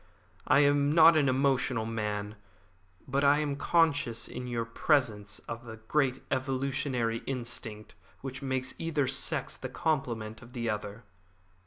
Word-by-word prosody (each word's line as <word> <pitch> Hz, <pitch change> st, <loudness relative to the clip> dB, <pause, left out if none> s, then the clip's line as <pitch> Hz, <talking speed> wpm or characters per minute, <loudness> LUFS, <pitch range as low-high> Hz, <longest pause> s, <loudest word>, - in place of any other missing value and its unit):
I 145 Hz, -, +6 dB
am 145 Hz, 0 st, +3 dB
not 165 Hz, +1 st, +7 dB
an 145 Hz, -3 st, +3 dB
emotional 130 Hz, -3 st, +1 dB
man, 105 Hz, -2 st, -3 dB, 0.7 s
but 140 Hz, +1 st, 0 dB
I 140 Hz, +1 st, +5 dB
am 150 Hz, -2 st, -1 dB
conscious 145 Hz, -7 st, +2 dB
in 125 Hz, -, -6 dB
your 120 Hz, -1 st, -2 dB
presence 110 Hz, -3 st, +1 dB
of 115 Hz, +1 st, -6 dB
the 115 Hz, -2 st, -9 dB
great 130 Hz, +3 st, 0 dB
evolutionary 130 Hz, -3 st, -1 dB
instinct 115 Hz, -4 st, -5 dB, 0.3 s
which 135 Hz, 0 st, -6 dB
makes 130 Hz, -1 st, -2 dB
either 160 Hz, -4 st, 0 dB
sex 130 Hz, +1 st, 0 dB
the -, -, -6 dB
complement 115 Hz, -8 st, -2 dB
of 120 Hz, +1 st, -14 dB
the 115 Hz, -2 st, -1 dB
other." 105 Hz, +1 st, -5 dB
130 Hz, 140 wpm, -30 LUFS, 115-140 Hz, 0.7 s, not